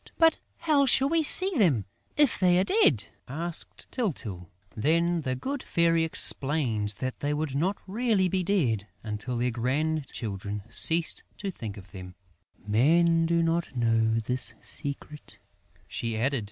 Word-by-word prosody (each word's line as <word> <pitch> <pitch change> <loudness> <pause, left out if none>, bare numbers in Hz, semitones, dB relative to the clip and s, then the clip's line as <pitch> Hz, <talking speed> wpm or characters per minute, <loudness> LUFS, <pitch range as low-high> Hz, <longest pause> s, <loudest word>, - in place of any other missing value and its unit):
"But 325 -1 +4 0.2
how 300 -4 +3
shall 265 +2 +4
we 330 +1 +2
see 370 +5 +3
them, 140 - +3 0.3
if 295 -4 +3
they 180 -2 +4
are 185 - +3
dead?" 190 - +2 0.2
asked 165 +5 -5
Tyltyl. 110 - -4 0.3
Then 170 +7 +1
the 130 -3 -2
good 270 - -4
Fairy 165 -1 +2
explained 130 -9 +2
that 130 +4 -4
they 145 +1 -1
would 150 -2 -3
not 175 +8 0
be - - -28
really 210 -1 +1 0.2
dead 125 - 0 0.2
until 110 +3 -4
their 125 +1 0
grandchildren 120 -6 -3
ceased 165 +7 +4 0.2
to 200 -2 -4
think 110 - -8
of 95 -3 -13
them: 90 -1 -10 0.5
"Men 165 +10 +3
do 170 0 +2
not 165 -3 -1
know 115 -1 +2
this 120 0 -4
secret," 145 0 -8 0.5
she 115 -1 -4
added. 135 +4 0
150 Hz, 145 wpm, -27 LUFS, 115-175 Hz, 0.5 s, But